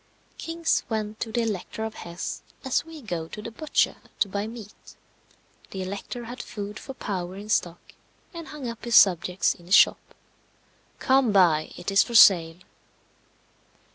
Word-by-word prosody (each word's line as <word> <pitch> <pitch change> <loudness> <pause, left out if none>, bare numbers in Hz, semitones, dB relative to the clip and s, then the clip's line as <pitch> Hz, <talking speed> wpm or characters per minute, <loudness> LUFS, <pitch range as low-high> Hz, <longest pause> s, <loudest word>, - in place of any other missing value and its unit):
Kings 330 0 0
went 215 -1 -3
to 225 - -4
the 235 +1 0
Elector 220 0 -4
of 220 0 -4
Hesse 170 -4 -6 0.2
as 265 - +1
we 320 -2 -12
go 175 -7 -4
to 210 - -9
the 225 +2 -7
butcher 305 +7 0 0.2
to - - +4
buy 200 +2 -3
meat. 220 -3 -12 0.7
The 190 -1 -5
Elector 200 +5 -6
had 245 +2 -7
food 205 0 -7
for 270 - -9
powder 185 -6 -4
in 205 +2 -9
stock, 175 -5 -1 0.4
and 335 -1 -8
hung 295 -4 -7
up 230 -1 -7
his 235 -1 0
subjects 180 0 +4
in 175 - -18
his 190 - +5
shop. - - +3 0.8
Come 260 -3 +3
buy; 170 -6 +3
it 175 +3 -4
is 195 - +6
for 235 - -3
sale. 170 -6 +7
210 Hz, 165 wpm, -25 LUFS, 185-240 Hz, 0.8 s, sale